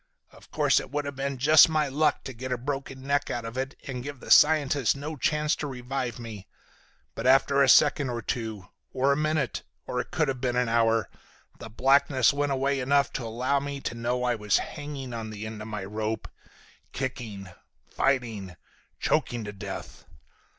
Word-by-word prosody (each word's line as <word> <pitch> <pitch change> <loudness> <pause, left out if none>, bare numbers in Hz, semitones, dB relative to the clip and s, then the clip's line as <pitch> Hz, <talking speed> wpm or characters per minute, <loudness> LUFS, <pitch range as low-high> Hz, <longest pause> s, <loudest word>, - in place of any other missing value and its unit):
Of - - -18
course - - +3
it - - -8
would 145 +2 -2
have 140 -1 -5
been 135 0 -3
just 150 +4 +7
my 155 -2 +1
luck 150 +2 +1
to 130 - -7
get 130 +2 -6
a 125 - 0
broken 135 +1 -5
neck 140 +1 0
out 120 -1 -3
of 115 +1 -6
it 135 +1 -3
and 125 -2 -4
give 140 0 -7
the - - -8
scientist 145 -4 +5
no 150 +3 -5
chance 150 +3 +1
to 150 - -3
revive 125 -2 -4
me. 110 -5 -9 0.7
But - - -3
after 135 +1 +5
a 135 - +5
second 145 0 +5
or 120 -2 -4
two, 110 -5 -4 0.3
or 135 +1 +2
a - - +3
minute, 155 -2 -1 0.2
or 125 - -3
it - - -4
could 165 -4 0
have 130 -2 -3
been 125 -2 0
an 125 -1 +2
hour, 115 -1 +2 0.5
the 115 - -8
blackness 135 +2 +3
went 145 0 0
away 135 +1 0
enough 140 +2 +2
to 125 - -3
allow 125 +5 0
me 140 0 -5
to - - -3
know 120 +2 -2
I 125 -1 +2
was 105 -3 +1
hanging 145 -4 -6
on 115 -1 -5
the 110 0 -7
end 110 -1 -7
of 110 - -7
the 105 -3 -5
rope, 110 +1 -3 0.7
kicking, 115 -7 -5 0.4
fighting, 115 -9 -1 0.4
choking 120 -2 0
to 105 0 -6
death. 100 - -8
130 Hz, 190 wpm, -27 LUFS, 115-140 Hz, 0.7 s, just